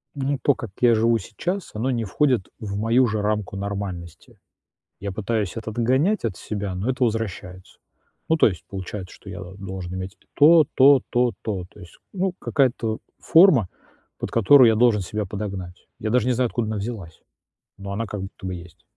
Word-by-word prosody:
ну 140 0 -1
то, 145 - +4
как 115 - -7
я 120 -2 +5
живу 115 +1 +3
сейчас, 180 - -4
оно 120 +5 -1
не 115 -2 -1
входит 125 0 +1
в 100 -3 -5
мою 115 +4 +3
же 110 -2 -1
рамку 105 -1 -1
нормальности. 100 -4 -6 0.6
Я 100 0 -4
пытаюсь 105 0 -2
это 110 0 -5
отгонять 130 - +1
от 105 -5 -2
себя, 100 -3 -4
но 100 +7 -2
это 130 0 -1
возвращается. 100 -5 -4 0.5
Ну 160 - +3
то - - +6
есть 95 -6 -5
получается, 95 0 -6
что 100 - -13
я 95 0 -7
должен 95 -1 -7
иметь 95 +1 -5
и - - -32
то, 155 +1 +7
то, 135 0 +7
то, 120 -1 +2
то. 95 -5 -3
То - - -17
есть, 85 -3 -14 0.2
ну 190 -1 -1
какая-то 120 -5 0 0.2
форма, 160 - +5 0.5
под - - -4
которую 120 +3 +6
я 110 - +3
должен 110 -2 +3
себя 105 +3 -3
подогнать. 95 -3 -6
Я 110 - -2
даже 125 +1 +2
не 125 - +3
знаю, 125 +1 +1
откуда 115 -1 -2
она 110 0 -2
взялась, 100 -6 -6 0.6
но 100 0 -7
она 115 +3 -2
как 105 -2 -6
будто 95 0 -9
бы 95 - -3
есть. 90 0 -13
110 Hz, 190 wpm, -23 LUFS, 95-125 Hz, 0.6 s, то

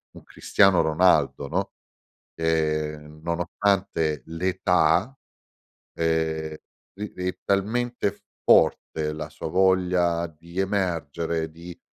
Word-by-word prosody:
un - - -12
Cristiano 95 -4 +3
Ronaldo, 80 -3 +2
no, - - -2 0.6
ehm, 75 -2 -1
nonostante 85 -2 0
l'età, 90 +5 +1 0.8
ehm, 80 -1 -1 0.4
ri 105 +1 -6
ri 90 0 -3
è 90 - -5
talmente 110 +2 0 0.3
forte 75 -1 +3
la 75 0 -6
sua 80 - -6
voglia 90 -1 +2
di 85 +3 -12
emergere, 85 -4 -1
di 85 +2 -11
85 Hz, 95 wpm, -25 LUFS, 80-95 Hz, 0.8 s, Cristiano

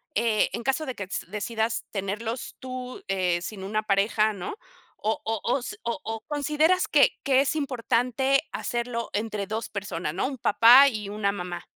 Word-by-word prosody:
eh, 225 -2 +2
en 235 - -3
caso 270 +4 0
de 260 - -4
que 200 - -5
s 185 - -4
decidas 220 +2 -2
tenerlos 215 +4 -4
tú, 255 -1 -6
eh, 180 -3 +1
sin 195 0 -6
una 215 +2 -1
pareja, 215 +1 +2
¿no? 190 - -5 0.4
¿O 220 +1 -1
o 225 -1 -1
o 255 +3 +1
s 420 +12 -7
o 235 - -2
o, 225 0 -4
consideras 305 +5 +2
que 290 -2 +4
que 270 -1 +4
es 285 - 0
importante 265 -1 +1
hacerlo 235 -1 -3
entre 210 -1 -2
2 220 +3 -3
personas, 190 -6 -4
¿no? 190 - 0
Un 270 -2 -5
papá 245 +6 +7
y 210 -5 -5
una 205 -1 0
mamá. 180 -3 -6
225 Hz, 180 wpm, -26 LUFS, 200-255 Hz, 0.4 s, papá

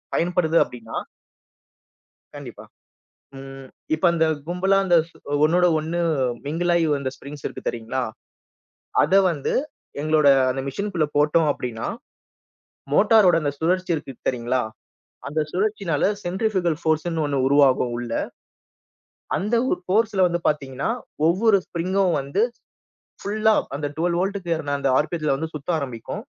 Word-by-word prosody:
பயன்படுது 170 -1 +1
அப்படின்னா, 115 -2 -10 1.4
கண்டிப்பா. - - -9 0.7
ம் 135 0 -10 0.3
இப்ப 155 - -5
அந்த 165 -1 +2 0.2
கும்பலா 190 +3 +2
அந்த 175 -2 +4
ஸ் - - -26 0.3
ஒண்ணோடு 175 +3 +4
ஒண்ணு 160 +3 -3 0.5
மிங்கிலாயி 170 +2 +1
வந்த 140 -2 -3
ஸ்ப்ரிங்ஸ் 140 +1 -10
இருக்கு - - -8
தெரியுங்களா? 120 +3 -3 1.0
அத - - 0 0.2
வந்து 150 -5 -2 0.5
எங்களோட 155 -1 +3 0.2
அந்த 135 +1 -2
மெஷின்குள்ள 180 +1 -1
போட்டோம் 150 +2 +3
அப்படின்னா 115 -4 -5 1.1
மோட்டாரோட 205 0 +5
அந்த 145 -1 -1
சுழற்சி 180 +3 0
இருக்குது 135 -5 -7
தெரியுங்களா? 125 0 0 0.7
அந்த 155 +2 -1
சுழற்சியினால 195 -5 0 0.2
சென்ட்ரிஃப்யூகல் 185 -3 0
ஃபோர்ஸுன்னு 160 +1 0
ஒண்ணு 145 -1 -1
உருவாகும் 135 -3 +4
உள்ள. 120 -1 -5 1.3
அந்த 210 +5 -1
ஒரு - - 0
ஃபோர்ஸ்ல 205 0 +1
வந்து 175 0 -1
பார்த்தீங்கன்னா 140 -1 -3 0.4
ஒவ்வொரு 200 +5 +4
ஸ்ப்ரிங்கும் 185 +1 0
வந்து 140 +9 -1 0.8
ஃபுல்லா 215 +2 +2 0.2
அந்த 145 +1 -2
12 170 +1 0
வோல்ட்டுக்கேறுன 175 -6 -2
அந்த 140 - 0
ஆர்.பி.எத்துல 155 -2 0
வந்து 160 +3 -4
சுத்த 150 +2 -8
ஆரம்பிக்கும். 125 -5 -6
160 Hz, 120 wpm, -23 LUFS, 140-180 Hz, 1.4 s, மோட்டாரோட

